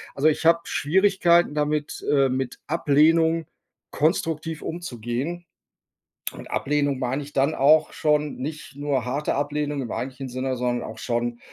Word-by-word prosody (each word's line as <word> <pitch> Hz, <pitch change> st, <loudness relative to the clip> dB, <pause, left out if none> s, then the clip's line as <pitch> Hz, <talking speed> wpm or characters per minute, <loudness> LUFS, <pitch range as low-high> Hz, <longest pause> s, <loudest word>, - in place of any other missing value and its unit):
Also, 140 Hz, +3 st, +2 dB
ich 155 Hz, +1 st, +1 dB
habe 165 Hz, +1 st, +6 dB
Schwierigkeiten 175 Hz, 0 st, +3 dB
damit, 150 Hz, 0 st, -1 dB
äh, 140 Hz, -2 st, +4 dB
mit 130 Hz, -1 st, -3 dB
Ablehnung 160 Hz, +2 st, +3 dB, 0.5 s
konstruktiv 160 Hz, 0 st, 0 dB
umzugehen 160 Hz, +1 st, -4 dB, 0.9 s
und -, -, -11 dB
Ablehnung 145 Hz, -2 st, 0 dB
meine 130 Hz, +3 st, -1 dB
ich 145 Hz, -, -11 dB
dann 140 Hz, +3 st, +2 dB
auch 150 Hz, +3 st, +4 dB
schon 150 Hz, -1 st, +1 dB
nicht 150 Hz, +1 st, -6 dB
nur 140 Hz, -3 st, -1 dB
harte 140 Hz, +4 st, -1 dB
Ablehnung 145 Hz, 0 st, -1 dB
im 120 Hz, -, -5 dB
eigentlichen 130 Hz, +1 st, -4 dB
Sinne, 130 Hz, +1 st, -2 dB
sondern 120 Hz, 0 st, -1 dB
auch -, -, -8 dB
schon 120 Hz, 0 st, -2 dB
145 Hz, 140 wpm, -24 LUFS, 130-160 Hz, 0.9 s, habe